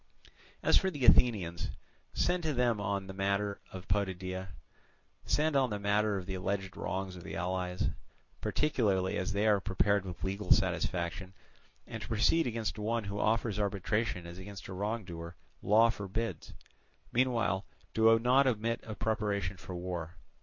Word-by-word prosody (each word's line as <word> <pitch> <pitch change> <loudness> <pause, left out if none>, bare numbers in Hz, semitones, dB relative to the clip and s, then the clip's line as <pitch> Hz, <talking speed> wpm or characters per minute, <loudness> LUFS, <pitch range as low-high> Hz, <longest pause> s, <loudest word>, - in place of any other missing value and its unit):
As - - +5
for 190 - 0
the 145 -8 -2
Athenians, 95 -10 +4 0.4
send 180 0 +1
to 155 -2 -1
them 120 -4 +2
on 100 -1 -1
the 95 - -7
matter 100 +1 -1
of 95 0 -8
Potidæa, 95 -1 -1 0.8
send 155 0 +2
on 135 -2 +3
the 105 - -2
matter 100 0 +1
of 95 - -5
the 95 - -4
alleged 95 +1 -2
wrongs 95 -1 -3
of 90 - -10
the - - -6
allies, 90 +1 -1 0.5
particularly 100 -11 +1
as 95 - -1
they 100 +2 +1
are 105 -2 +5
prepared 100 +1 +1
with 90 -1 -7
legal 100 +2 -2
satisfaction; 90 +2 +1 0.5
and 110 -2 -7
to - - -6
proceed 120 +9 +3
against 115 -2 -2
one 115 +2 0
who 100 +1 -4
offers 110 -1 +1
arbitration 100 -1 -1
as 85 +1 -9
against 100 0 -8
a 95 - -6
wrongdoer, 90 -5 -4 0.3
law 115 +3 +5
forbids. 100 -4 -4 0.6
Meanwhile 115 -6 +1 0.3
do 115 0 +6
not 130 +4 +4
omit 115 -1 0 0.2
preparation 100 -4 -1
for 90 - -8
war. 90 -1 -4
100 Hz, 155 wpm, -32 LUFS, 95-115 Hz, 0.8 s, do